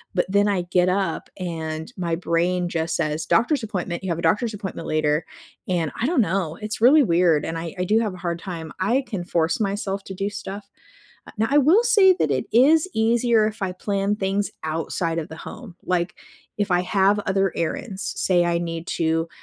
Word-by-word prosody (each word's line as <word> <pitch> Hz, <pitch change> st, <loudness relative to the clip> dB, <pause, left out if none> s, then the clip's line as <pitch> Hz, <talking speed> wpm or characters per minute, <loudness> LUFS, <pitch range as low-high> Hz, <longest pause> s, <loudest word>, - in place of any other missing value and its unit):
but 180 Hz, -, +2 dB
then 200 Hz, +2 st, +2 dB
I 195 Hz, -3 st, +1 dB
get 180 Hz, 0 st, +3 dB
up 190 Hz, -2 st, -1 dB
and 160 Hz, 0 st, -5 dB
my 170 Hz, -2 st, -1 dB
brain 175 Hz, +1 st, 0 dB
just 165 Hz, -1 st, -2 dB
says, 155 Hz, +1 st, -1 dB
"Doctor's 265 Hz, +4 st, +2 dB
appointment, 185 Hz, -4 st, -4 dB
you 190 Hz, -, -3 dB
have 170 Hz, -, -1 dB
a -, -, -3 dB
doctor's 215 Hz, +7 st, +1 dB
appointment 195 Hz, -3 st, -6 dB
later," 155 Hz, 0 st, +1 dB, 0.4 s
and 170 Hz, -4 st, 0 dB
I 240 Hz, -, +1 dB
dunno, 195 Hz, -, 0 dB
it's 215 Hz, +3 st, -4 dB
really 280 Hz, +6 st, +7 dB
weird 170 Hz, -, +3 dB
and 165 Hz, 0 st, -3 dB
I 165 Hz, +2 st, -6 dB
I 180 Hz, -, -1 dB
do 215 Hz, +5 st, +2 dB
have 215 Hz, -4 st, -1 dB
a -, -, -10 dB
hard 170 Hz, -2 st, -3 dB
time. 165 Hz, -4 st, -7 dB
I 235 Hz, +9 st, +1 dB
can 190 Hz, -5 st, -4 dB
force 165 Hz, -1 st, 0 dB
myself 200 Hz, -1 st, -2 dB
to 190 Hz, -, -7 dB
do 195 Hz, +2 st, -2 dB
stuff, 200 Hz, 0 st, -7 dB, 0.6 s
uh -, -, -12 dB
now 220 Hz, +1 st, +1 dB
I 290 Hz, -, +5 dB
will 320 Hz, -, +5 dB
say 405 Hz, -6 st, +6 dB
that 155 Hz, -, 0 dB
it 130 Hz, -2 st, 0 dB
is 300 Hz, +9 st, +5 dB
easier 230 Hz, 0 st, +3 dB
if 220 Hz, 0 st, -8 dB
I 190 Hz, -1 st, -1 dB
plan 200 Hz, +2 st, -1 dB
things 200 Hz, 0 st, -1 dB
outside 165 Hz, +1 st, -2 dB
of 160 Hz, -, -4 dB
the 160 Hz, -, -9 dB
home, 220 Hz, -8 st, -9 dB
like 175 Hz, -2 st, -1 dB, 0.4 s
if 205 Hz, -2 st, -1 dB
I 180 Hz, 0 st, +3 dB
have 195 Hz, +2 st, +2 dB
other 195 Hz, -2 st, +1 dB
errands, 195 Hz, +5 st, -3 dB
say 175 Hz, -2 st, +2 dB
I 170 Hz, 0 st, +1 dB
need 165 Hz, -1 st, -4 dB
to, 165 Hz, 0 st, +1 dB
185 Hz, 205 wpm, -23 LUFS, 170-210 Hz, 0.6 s, really